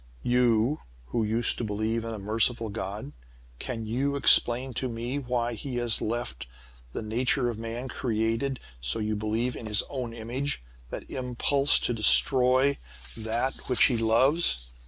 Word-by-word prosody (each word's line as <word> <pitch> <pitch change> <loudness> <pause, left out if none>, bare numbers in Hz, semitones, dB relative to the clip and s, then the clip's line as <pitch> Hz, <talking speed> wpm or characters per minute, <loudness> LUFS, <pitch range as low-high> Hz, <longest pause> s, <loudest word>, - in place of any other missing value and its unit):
"You, 125 +2 +2 0.3
who 110 - -1
used 110 +2 +3
to - - -2
believe 110 +2 -2
in 115 - -5
a 110 - -5
merciful 110 +3 +2
God, 100 -5 -6 0.5
can 115 -3 -5
you 135 +6 -1
explain 130 -2 +5
to 130 +2 -3
me 120 +4 -4
why 120 -2 -2
he 125 +3 -6
has 120 -2 +1
left 120 - -4
in - - -26 0.4
the - - -4
nature 120 +3 0
of 110 - -8
man, 115 +3 -5
created 115 +2 -2 0.2
so 60 - -1
you 110 -1 -2
believe 110 +4 -2
in 110 - -7
His 105 -1 +1
own 125 -4 -4
image 120 - -4 0.3
that - - -7
impulse 135 +2 +2
to 120 - 0
destroy 130 +4 +3 0.4
that 115 +5 -3
which 125 - +3
he 125 - +4
loves? 115 - +2
120 Hz, 155 wpm, -27 LUFS, 110-125 Hz, 0.5 s, explain